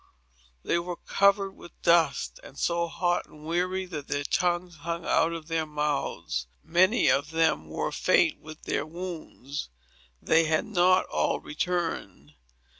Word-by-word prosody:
They 170 - +1
were 175 +1 -4
covered 200 +2 +2
with 175 - -15
dust, 170 - +3
and - - -13
so 170 0 0
hot 175 +1 0
and 150 0 -15
weary 180 +3 0
that 155 -6 -7
their 145 0 -1
tongues 175 +2 0
hung 170 +2 -4
out 165 - +3
of 165 -2 -6
their 165 -1 -1
mouths. 150 - -2 0.2
Many 185 +4 +3
of 140 +3 +1
them 160 - +1
were 80 - -2
faint - - +3
with 155 0 -12
wounds. 160 - -5 0.5
They 165 - +3
had 155 +5 +1
not 185 -3 +3
all - - 0
returned. 150 - -3
170 Hz, 140 wpm, -27 LUFS, 150-180 Hz, 0.5 s, dust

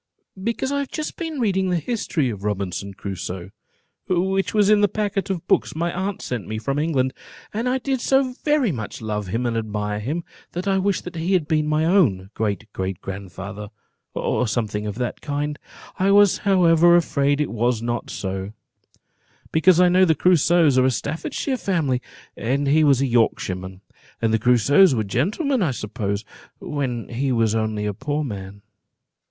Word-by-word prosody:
"Because 235 +4 -1
I 285 - 0
have 280 - -3
just 310 - -4
been 325 -4 -4
reading 190 -5 +1
the 180 - +1
history 165 - -1
of 100 -2 -8
Robinson 100 -1 -3
Crusoe, 95 -1 -6 0.6
which 190 +2 +1
was 210 -2 +3
in 210 -1 +5
the 205 - +5
packet 205 -2 -2
of 185 -4 -3
books - - +1
my 170 +1 -1
aunt 190 +2 -3
sent 120 -6 -4
me 110 - -3
from 135 +6 -2
England; 135 -5 +1 0.4
and 230 +4 -1
I 255 - +1
did 265 -1 -2
so 265 -1 +2
very 295 - +2
much 110 -8 -5
love 105 -2 -3
him 115 +6 -2
and 120 -1 0
admire 105 -2 -2
him, 150 +11 -3 0.3
that 180 +3 -4
I 195 -1 +2
wished 195 -1 -1
he 170 +4 -1
had 170 -5 +2
been 155 -1 +1
my 155 +1 +1
own 115 - +2
great 110 -1 -2
great 95 -1 -3
grand 95 -1 -7
father, 100 +3 -7 0.5
or 125 - 0
something 105 -2 -2
of 105 - -4
that 125 +1 -3
kind. 145 0 -3 0.4
I 190 +1 +3
was, 200 -1 +5
however, 175 -3 +5
afraid 145 -4 +2
it 150 - -1
was 115 0 0
not 120 0 -3
so, 95 +1 -4 1.0
because 175 +2 +4
I 180 - +6
know 180 +1 +5
the 160 -3 +3
Crusoes 165 -5 +4
are 130 - +4
a - - +4
Staffordshire 160 - -2
family, 155 - 0 0.3
and 135 +5 -1
he 150 +3 +4
was 140 -3 +4
a - - +3
Yorkshireman; 95 -6 0 0.4
and 115 -1 +1
the 110 - +3
Crusoes 125 - +5
were 110 - 0
gentlemen, 210 - 0
I 175 - +2
suppose, 105 -3 -3 0.3
when 130 -5 -3
he 130 +3 -1
was 115 -3 +2
only 110 -1 -1
a 105 - -1
poor 145 +7 -2
man." 100 -5 -7
140 Hz, 180 wpm, -22 LUFS, -, 1.0 s, I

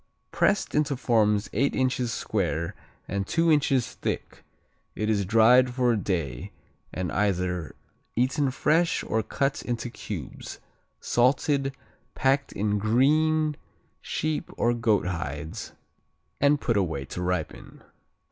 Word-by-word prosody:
Pressed 205 - +1
into 150 -2 +1
forms 105 -5 +2
eight 140 +6 +1
inches 125 -2 0
square 85 -8 -2 0.3
and 100 -1 -2
two 165 -1 +2
inches 140 -5 +2
thick, - - -5 0.5
it 110 +1 0
is 100 -2 +1
dried 115 +5 +5
for 125 -2 +3
a - - +2
day 85 - -3 0.4
and 90 -1 -3
either 90 -5 -1 0.4
eaten 130 +4 +1
fresh 160 +6 +1
or 110 - 0
cut 135 +6 -1
into 120 0 -4
cubes, 95 - -7 0.4
salted, 135 +2 +1 0.4
packed 135 +1 +1
in 105 0 0
green 150 +7 +2 0.5
sheep 155 -1 -2
or 120 - +2
goat 115 -5 +1
hides, 80 -3 -5 0.7
and 145 +1 +4
put 115 -5 0
away 80 -8 -1
to 90 - -6
ripen. 90 -3 -4
115 Hz, 120 wpm, -26 LUFS, 95-135 Hz, 0.7 s, dried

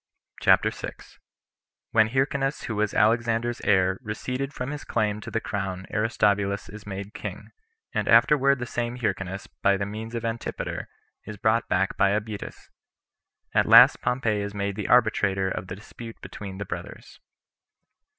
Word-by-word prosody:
CHAPTER - - +4
6. - - -9 0.7
When 110 -1 +5
Hyrcanus 135 +3 0
Who 110 - -4
Was 105 -1 +1
Alexander's 115 +2 +2
Heir, 95 -1 +3
Receded 125 +4 -4
From 130 -1 -5
His 150 -1 -6
Claim 105 0 -1
To - - -7
The 115 - -1
Crown 95 -4 -4
Aristobulus 100 -2 +1
Is 105 +1 -11
Made 100 +1 -6
King; - - -7 0.4
And - - -1
Afterward 140 -1 +5
The 120 - -4
Same 120 0 -3
Hyrcanus 95 -5 -3 0.2
By 100 0 +4
The 100 - -2
Means 110 +3 -6
Of 115 0 -3
Antipater, 115 0 -4 0.4
Is 105 - -7
Brought 110 +3 +1
Back 95 +1 +1
By 100 +1 +3
Abetas. 105 -1 -9 0.8
At - - +3
Last - - +8
Pompey 115 -5 0
Is 100 0 -5
Made 100 0 -2
The - - -4
Arbitrator 100 -5 +3
Of 90 - -4
The 90 - -6
Dispute 115 +3 -11
Between 95 -2 -8
The 100 - -5
Brothers. - - -8
105 Hz, 155 wpm, -26 LUFS, 100-120 Hz, 0.8 s, Last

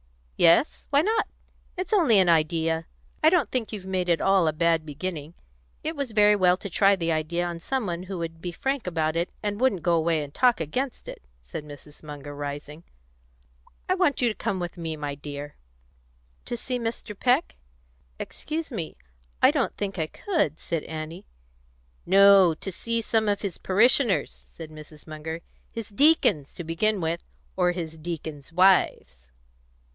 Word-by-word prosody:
"Yes; 170 - +3
why 285 +1 +4
not? 440 +3 +1 0.5
It's 370 +4 -3
only 320 - +5
an 190 -2 +5
idea. 160 0 +1 0.4
I 315 - +8
don't 325 - +2
think 245 -4 -2
you've 205 -4 -6
made 185 -1 -1
at 170 - +3
all 195 -3 +3
a 155 - +1
bad 165 0 +2
beginning. 155 +1 -6 0.5
It 320 +1 -3
was 280 -6 -4
very 210 -1 +6
well 180 -2 +4
to 200 - -7
try 195 +3 +4
the 170 -3 -1
idea 165 +2 -1
on 170 -1 -4
some 260 +7 -2
one 175 -2 -3
who 190 - -4
would 165 -1 -5
be 175 - -4
frank 270 +5 -2
about 160 -2 0
it, 170 +2 0
and 205 +2 -2
wouldn't 215 -10 +2
go 175 - +2
away 165 -1 +2
and 145 0 -10
talk 250 -2 +3
against 250 - -3
it," - - -8 0.2
said 65 - -7
Mrs. 145 0 -13
Munger, 145 -1 -8
rising. 145 +2 -6 1.0
"I 370 - +3
want 365 -7 +2
you 245 - +3
to - - -2
come 195 -2 -3
with 175 -1 -4
me, 165 -2 -4
my 145 -1 -4
dear." 145 0 -8 0.9
"To 240 - -3
see 250 +1 -3
Mr. 230 -2 -4
Peck? 255 +8 +2 0.6
Excuse 315 0 -5
me. 170 -10 -5 0.5
I - - +8
don't - - -1
think 195 -3 -3
I 160 - 0
could," 240 - -1
said 165 -3 -3
Annie. 160 +4 -7 0.8
"No; 195 -3 +7
to 195 - -6
see 230 +5 -2
some 220 -1 +1
of 205 - 0
his 195 -4 -4
parishioners," 210 - +2
said 160 -2 -9
Mrs. 155 0 -13
Munger. 160 +1 -6 0.3
"His 230 -2 -7
deacons, 205 - +3
to 175 - -6
begin 195 +6 0
with, 165 0 -2 0.3
or 180 -1 +2
his 165 -3 -5
deacons' 155 -3 -6
wives." 180 - +2
175 Hz, 175 wpm, -26 LUFS, 160-220 Hz, 1.0 s, I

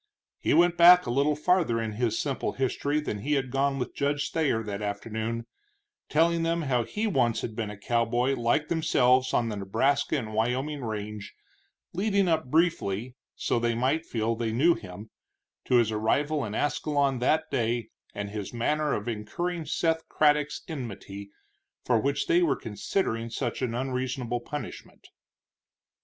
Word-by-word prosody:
He - - +2
went 175 0 +4
back 180 +1 +8
a 120 - -2
little 140 +4 +2
farther 150 -6 +2
in 115 -1 -2
his 115 0 -1
simple 140 -3 -2
history 140 +3 0
than 105 -8 -4
he 145 +8 -1
had 135 -3 0
gone 135 +1 +1
with 125 - -4
Judge 145 0 -1
Thayer 140 -9 +1
that 105 -1 -5
afternoon, 110 +3 -3 0.6
telling 165 +2 +3
them 165 0 0
how 125 -5 +1
he 210 - -3
once 125 - +1
had 110 - -5
been 110 -2 -3
a 105 - -8
cowboy 120 +4 +1
like 130 +4 +1
themselves 130 -6 +3
on 115 -1 +1
the 105 - -4
Nebraska 115 +10 +1
and 110 -5 -5
Wyoming 130 +6 -1
range, 105 -2 -5 0.6
leading 200 +1 +1
up 160 -3 +1
briefly, 130 - 0 0.2
so - - 0
they 115 0 0
might 135 +7 +1
feel 115 0 -1
they 115 -1 -2
knew 150 +10 +4
him, 100 - -10 0.5
to 125 - +2
his 115 -3 +4
arrival 140 +8 0
in 105 0 -5
Ascalon 145 -2 0
that 155 +6 +1
day, 115 -1 -1 0.3
and 100 0 -4
his 105 -2 -5
manner 150 +5 0
of 105 - -3
incurring 160 +10 -3
Seth 160 +1 0
Craddock's 150 -1 +2
enmity, 100 - -7 0.6
for 120 -3 +3
which 140 +4 0
they 175 - +3
were 160 -6 +3
considering 115 - -2
such 115 - -3
an 120 -3 -1
unreasonable 125 -1 -2
punishment. 145 +5 -8
125 Hz, 160 wpm, -27 LUFS, 115-150 Hz, 0.6 s, back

